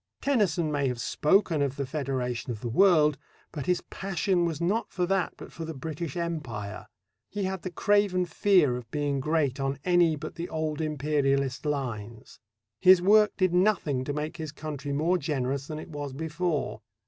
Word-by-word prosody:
Tennyson 190 - +1
may 140 -2 +1
have 125 -2 -2
spoken 160 - +2
of 140 -1 0
the 140 -1 -2
federation 130 -4 -3
of 110 -3 -4
the 120 - -3
world, 150 - +4 0.3
but 145 - -6
his 180 -1 +2
passion 190 -1 -1
was 165 -3 -2
not 195 +7 0
for 180 -2 0
that 190 0 0
but - - -10
for 165 - -6
the 160 -1 -6
British 155 +2 -5
Empire. 125 -12 -4 0.4
He 205 -1 -3
had 190 -1 -2
the 185 - -4
craven 200 -1 +2
fear 175 -8 +3
of 120 -2 -10
being 145 -1 -1
great 145 -2 0
on 135 0 -1
any 175 -3 +4
but 150 - -7
the 170 +1 -5
old 155 -1 -2
Imperialist 140 -2 0
lines. 115 -6 -4 0.4
His 185 - +7
work 210 +3 +5
did 185 -3 +2
nothing 180 -8 +2
to 145 - -2
make 150 +3 -4
his 155 -3 -5
country 150 -2 -6
more 165 +6 +1
generous 135 -2 -2
than 155 - -5
it 155 - -8
was 145 -3 -5
before. 160 +2 -2
155 Hz, 180 wpm, -28 LUFS, 140-175 Hz, 0.4 s, His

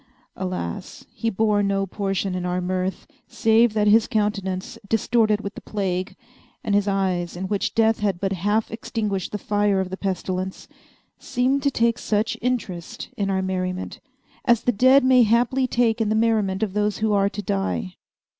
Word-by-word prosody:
Alas! 180 - -5
he 230 - -1
bore 210 0 +2
no 200 -1 0
portion 195 0 -2
in 180 -1 -3
our 180 0 -1
mirth, 185 0 -2 0.2
save 225 0 +3
that 210 -1 +1
his 215 +2 +5
countenance, 205 -5 -2
distorted 220 -1 +2
with 200 0 -5
the - - -10
plague, 185 -3 -3 0.5
and 205 - -1
his 205 0 +2
eyes, 185 -3 -1
in 190 +1 -3
which 205 0 -2
Death 225 0 +3
had 200 -4 0
but 195 0 -1
half 205 +4 0
extinguished 210 -4 -3
the 210 - -2
fire 205 -1 +1
of 185 -1 -2
the 190 - -4
pestilence, 185 -1 -3 0.5
seemed 260 +3 0
to 280 - +2
take 235 -2 +1
such 215 +1 0
interest 220 -9 -3
in 200 -1 -1
our 190 -1 0
merriment 185 0 -3 0.4
as 240 -3 +3
the 245 - +3
dead 255 +5 +5
may 255 -1 +5
haply 240 +4 +2
take 235 -2 +1
in 215 - +1
the 215 - +1
merriment 220 -3 +1
of 200 -4 -2
those 210 0 0
who 215 -1 +1
are 200 0 +3
to 205 +1 -6
die. 95 - -2
205 Hz, 175 wpm, -23 LUFS, 190-225 Hz, 0.5 s, his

